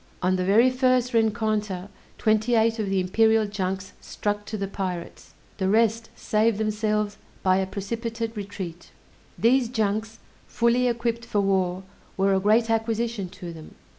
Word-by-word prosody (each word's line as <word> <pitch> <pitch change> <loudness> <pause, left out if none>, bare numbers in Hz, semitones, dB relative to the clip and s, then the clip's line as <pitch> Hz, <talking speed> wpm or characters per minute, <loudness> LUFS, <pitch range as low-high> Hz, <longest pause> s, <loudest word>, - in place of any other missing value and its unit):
On 185 +1 +3
the 185 - 0
very 225 +7 +5
first 255 -1 +2
rencontre, 215 -4 0 0.3
twenty 220 +2 +2
eight 225 0 +2
of 205 -3 -1
the 195 0 +1
imperial 220 +4 +3
junks 190 -2 -3
struck 205 0 -3
to 215 - -5
the 195 -1 -2
pirates; 185 -3 -6 0.2
the 190 -1 +1
rest 225 +1 +2
saved 215 0 +1
themselves 210 -1 -1 0.3
by 185 0 +4
a 190 0 0
precipitate 230 +3 -4
retreat. 190 -4 -7 0.5
These 245 +1 +3
junks, 220 -1 -1 0.3
fully 240 +1 +2
equipped 235 -1 -1
for 210 -3 0
war, 190 -2 0 0.3
were 195 0 +3
a 190 - +3
great 215 +4 +3
acquisition 225 -3 -1
to 175 -1 -8
them. 160 -1 -12
215 Hz, 150 wpm, -25 LUFS, 195-230 Hz, 0.5 s, very